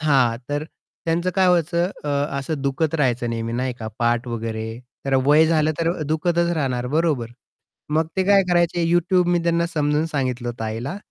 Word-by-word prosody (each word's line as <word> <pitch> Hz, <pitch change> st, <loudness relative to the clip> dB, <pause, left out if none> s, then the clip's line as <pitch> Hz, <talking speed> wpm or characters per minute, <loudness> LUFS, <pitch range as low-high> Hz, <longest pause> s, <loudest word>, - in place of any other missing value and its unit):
हां. 135 Hz, -6 st, +3 dB
तर 145 Hz, +1 st, -2 dB, 0.4 s
त्यांचं 170 Hz, +2 st, 0 dB
काय 190 Hz, -1 st, +4 dB
व्हायचं 175 Hz, +1 st, +2 dB
अ, -, -, -3 dB, 0.3 s
असं 140 Hz, +1 st, -3 dB
दुखत 145 Hz, +3 st, 0 dB
राहायचं 125 Hz, -5 st, +1 dB
नेहमी 115 Hz, 0 st, -3 dB
नाही 125 Hz, +1 st, -1 dB
का 110 Hz, -1 st, -5 dB
पाठ 120 Hz, +1 st, +1 dB
वगैरे. 110 Hz, 0 st, -4 dB, 0.3 s
तर 135 Hz, -1 st, 0 dB
वय 150 Hz, +3 st, +5 dB
झालं 155 Hz, -1 st, +2 dB
तर 165 Hz, 0 st, +1 dB, 0.2 s
दुखतच 170 Hz, +2 st, +1 dB
राहणार 125 Hz, -4 st, -1 dB
बरोबर. 145 Hz, -5 st, 0 dB, 0.6 s
मग 160 Hz, +1 st, +2 dB
ते 190 Hz, -, +3 dB
काय 200 Hz, 0 st, +5 dB
करायचे? 175 Hz, -1 st, +2 dB
YouTube 175 Hz, +1 st, +3 dB
मी 175 Hz, 0 st, +3 dB
त्यांना 170 Hz, 0 st, +1 dB
समजून 150 Hz, -1 st, 0 dB
सांगितलं 130 Hz, -5 st, -2 dB
होतं 115 Hz, -1 st, -5 dB
आईला. 115 Hz, -, -4 dB
150 Hz, 175 wpm, -22 LUFS, 120-170 Hz, 0.6 s, वय